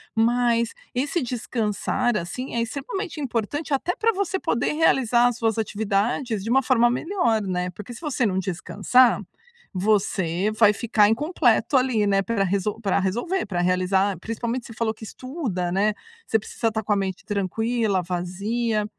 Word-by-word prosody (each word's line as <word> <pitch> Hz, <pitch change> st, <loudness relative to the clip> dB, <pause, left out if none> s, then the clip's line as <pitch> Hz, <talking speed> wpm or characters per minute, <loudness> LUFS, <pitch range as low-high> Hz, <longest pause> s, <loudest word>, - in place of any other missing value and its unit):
Mas 235 Hz, 0 st, +2 dB, 0.2 s
esse 285 Hz, +6 st, 0 dB
descansar 235 Hz, -1 st, -1 dB
assim 235 Hz, +10 st, -5 dB
é 235 Hz, -, +1 dB
extremamente 315 Hz, -, -4 dB
importante 270 Hz, +5 st, -3 dB
até 335 Hz, +6 st, 0 dB
pra 455 Hz, +1 st, +2 dB
você 380 Hz, -1 st, -1 dB
poder 235 Hz, -4 st, 0 dB
realizar 250 Hz, -6 st, +3 dB
as 245 Hz, -1 st, -1 dB
suas 225 Hz, -2 st, 0 dB
atividades 215 Hz, +1 st, -1 dB
de 225 Hz, -, -4 dB
uma 265 Hz, +2 st, +4 dB
forma 240 Hz, -2 st, +4 dB
melhor, 245 Hz, -, 0 dB
né? 180 Hz, -1 st, -2 dB
Porque 210 Hz, +6 st, -9 dB
se 235 Hz, -, -11 dB
você 290 Hz, -6 st, 0 dB
não 190 Hz, -3 st, +1 dB
descansar, 200 Hz, +7 st, +2 dB, 0.5 s
você 190 Hz, -1 st, +1 dB
vai 210 Hz, -2 st, +6 dB
ficar 215 Hz, -1 st, +3 dB
incompleto 295 Hz, +2 st, +2 dB
ali, 245 Hz, -5 st, +2 dB
né, 195 Hz, -1 st, +3 dB
pra 225 Hz, -2 st, 0 dB
resol 200 Hz, +4 st, -1 dB
pra 200 Hz, -2 st, +1 dB
resolver 240 Hz, -, -1 dB
pra 180 Hz, -4 st, -2 dB
realizar, 185 Hz, +2 st, +1 dB
principalmente 235 Hz, +4 st, -3 dB
você 230 Hz, -, -10 dB
falou 220 Hz, 0 st, -1 dB
que 220 Hz, -, -14 dB
estuda, 220 Hz, -, -4 dB
né? 205 Hz, +3 st, +2 dB, 0.3 s
Você 220 Hz, -, +2 dB
precisa 225 Hz, +2 st, -2 dB
estar 220 Hz, -1 st, -3 dB
com 210 Hz, -, +1 dB
a -, -, +2 dB
mente 190 Hz, -2 st, -3 dB
tranquila, 210 Hz, +1 st, 0 dB
vazia. 205 Hz, +6 st, -1 dB
225 Hz, 160 wpm, -24 LUFS, 200-250 Hz, 0.5 s, vai